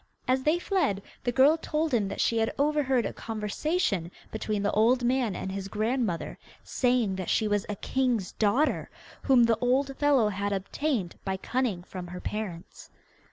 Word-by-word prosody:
As 260 +1 +2
they 305 +5 +2
fled, 335 - 0 0.2
the 245 - +2
girl 275 +6 +5
told 310 -1 -1
him 215 -5 +2
that - - -6
she 230 - +2
had 225 - +1
overheard 280 -5 +2
a - - -3
conversation 215 - -1 0.2
between 215 -2 -2
the 205 - +1
old 240 +4 +3
man 245 -5 +1
and 190 - -4
his 195 0 -4
grandmother, 215 -3 -2 0.2
saying 245 -7 +1
that 185 - -4
she 220 - +2
was 205 -1 0
a 210 - -2
king's 245 -3 -1
daughter, 235 +9 +1 0.3
whom 260 -3 +5
the 230 -1 +3
old 270 +3 +1
fellow 280 -7 +3
had 200 0 -2
obtained 200 - -2
by 190 -1 -2
cunning 225 -4 -1
from 180 -1 -8
her 180 +1 -7
parents. 190 -6 -6
230 Hz, 170 wpm, -28 LUFS, 200-265 Hz, 0.3 s, girl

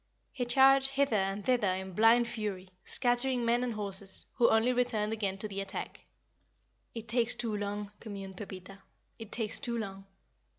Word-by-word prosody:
He 250 -3 -3
charged 270 +2 +6
hither 275 -3 +1
and 195 0 -1
thither 245 -5 +2
in 190 0 -6
blind 230 +4 +5
fury, 200 -5 -5
scattering 245 0 +1
men 240 +1 +2
and 240 -3 -2
horses, 200 -2 -1
who 235 - +4
only 225 +3 +3
returned 225 -4 0
again 200 -3 -2
to 215 - -3
the 195 -1 -4
attack. 195 - -7 0.9
"It 230 0 -7
takes 235 +1 +3
too 225 -3 -3
long," 205 0 -4
communed 195 -3 -8
Pepita, 195 -1 -9 0.4
"It 225 -2 -9
takes 220 -3 -2
too 240 -4 -3
long." 195 -3 -6
220 Hz, 165 wpm, -31 LUFS, 195-240 Hz, 0.9 s, charged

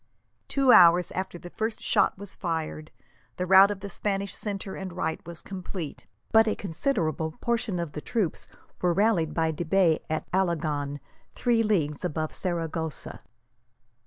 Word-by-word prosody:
Two 270 -2 +3
hours 175 -4 +7
after 190 -1 -4
the 175 0 -11
first 220 0 -3
shot - - +2
was 200 0 -7
fired, 160 -3 -4 0.5
the 180 - -1
rout 190 +2 +8
of 205 -1 -4
the 200 - -5
Spanish 200 0 -2
centre 200 -2 -4
and 190 -2 -6
right 160 -2 -3
was 170 -1 -6
complete, 185 -4 -7 0.2
but 225 0 +6
a 215 - +1
considerable 160 - -1
portion 235 -5 -1
of 170 -3 -3
the 150 - -6
troops 215 -7 -2 0.3
were 180 -1 +2
rallied 190 -5 +2
by 160 -1 +1
de 160 +2 -4
Bay 170 -1 +3
at 155 0 -2
Alagon, 155 -6 0 0.4
three 235 -2 +2
leagues 165 -10 0
above 155 -2 -2
Saragossa. 165 -4 -4
180 Hz, 155 wpm, -27 LUFS, 160-200 Hz, 0.5 s, rout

